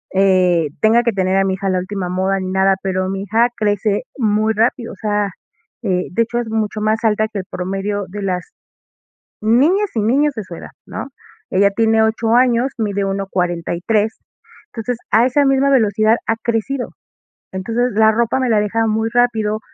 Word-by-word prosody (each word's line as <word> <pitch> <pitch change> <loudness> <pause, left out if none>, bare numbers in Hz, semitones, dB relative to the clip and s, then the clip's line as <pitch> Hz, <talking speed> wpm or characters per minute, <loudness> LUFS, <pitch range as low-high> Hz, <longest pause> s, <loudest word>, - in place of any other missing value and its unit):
eh, 185 -4 +3
tenga 225 +2 +4
que 235 - +1
tener 190 0 +1
a 195 - +3
mi 190 -1 0
hija 195 +1 -4
a - - +2
la 185 - +1
última 185 0 -4
moda 190 +2 0
ni 185 -1 -4
nada, 190 0 +3
pero 185 -1 -1
mi 195 0 -3
hija 225 +4 +2
crece 205 -1 0
muy 215 -2 +1
rápido, 230 +2 0
o - - -11
sea, 205 -2 -1 0.5
eh, 185 -4 0
de 205 - +1
hecho 235 +1 -3
es 235 -2 -4
mucho 215 -1 -2
más 215 +1 0
alta 215 -1 +2
que 215 -2 -5
el 185 - -6
promedio 195 +2 -3
de 205 +3 -6
las 180 -2 -2 1.0
niñas 300 - +3
y 220 - +1
niños 280 +7 +2
de 220 -4 -5
su 180 - -9
edad, - - -10 0.2
¿no? - - -6 0.4
Ella 200 +1 +3
tiene 225 +2 +2
8 225 +1 +1
años, 250 0 +3
mide 200 -3 -1
1.43, 195 +2 -1 0.6
entonces, 235 +1 -4
a 225 +3 +4
esa 280 +3 +2
misma 270 0 +3
velocidad 220 -3 +3
ha 225 - +1
crecido. 240 +3 -2 0.6
Entonces, 230 +6 -1
la 220 +1 +5
ropa 235 +3 0
me 255 - 0
la 220 - +3
ha - - +3
dejado 225 +2 0
muy 220 +1 0
rápido, 220 -3 +1
215 Hz, 190 wpm, -18 LUFS, 195-230 Hz, 1.0 s, la